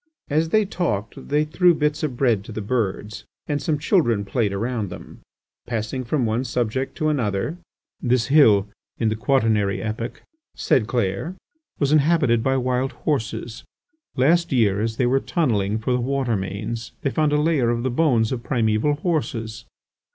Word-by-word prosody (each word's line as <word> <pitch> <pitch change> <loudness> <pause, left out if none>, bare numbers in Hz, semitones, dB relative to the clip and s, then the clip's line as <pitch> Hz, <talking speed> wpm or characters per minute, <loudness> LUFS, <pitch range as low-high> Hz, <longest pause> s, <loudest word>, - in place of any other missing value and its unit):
As 160 +2 +2
they 215 +3 +3
talked, 115 - -3
they 150 +2 +2
threw 175 +3 +3
bits 150 -1 0
of 140 -6 -2
bread 120 -7 +2
to - - -9
the 110 - -5
birds, 105 -2 -2 0.2
and 145 -2 -2
some 150 +2 0
children 130 - +2
played 110 -1 0
around 110 0 -2
them. - - -10 0.5
Passing 115 +2 -3
from 125 +1 0
one 115 +3 0
subject 125 +1 -2
to 155 - +1
another: 125 - -1 0.4
"This 125 -1 +2
hill, 110 -9 +5 0.3
in 110 - +1
the 110 - -1
quaternary 110 -5 +1
epoch," 115 +2 -5 0.3
said 110 -5 +1
Clair, 120 - -1 0.4
"was 140 -1 +1
inhabited 150 -6 +3
by 135 +3 +1
wild 130 +1 0
horses. 115 -5 -2 0.5
Last 170 +6 +3
year, 105 -6 +2
as 110 0 -2
they 125 - +2
were 130 +2 +3
tunnelling 110 - 0
for 110 +3 -2
the 125 - +1
water 130 -2 0
mains, 105 +4 -4
they 140 - 0
found 155 0 +1
a 150 - +2
layer 150 -6 +2
of 120 0 -1
the 130 - 0
bones 120 -6 +2
of 125 -3 -2
primeval 115 +2 +1
horses." 120 -9 -3
125 Hz, 165 wpm, -22 LUFS, 110-145 Hz, 0.5 s, hill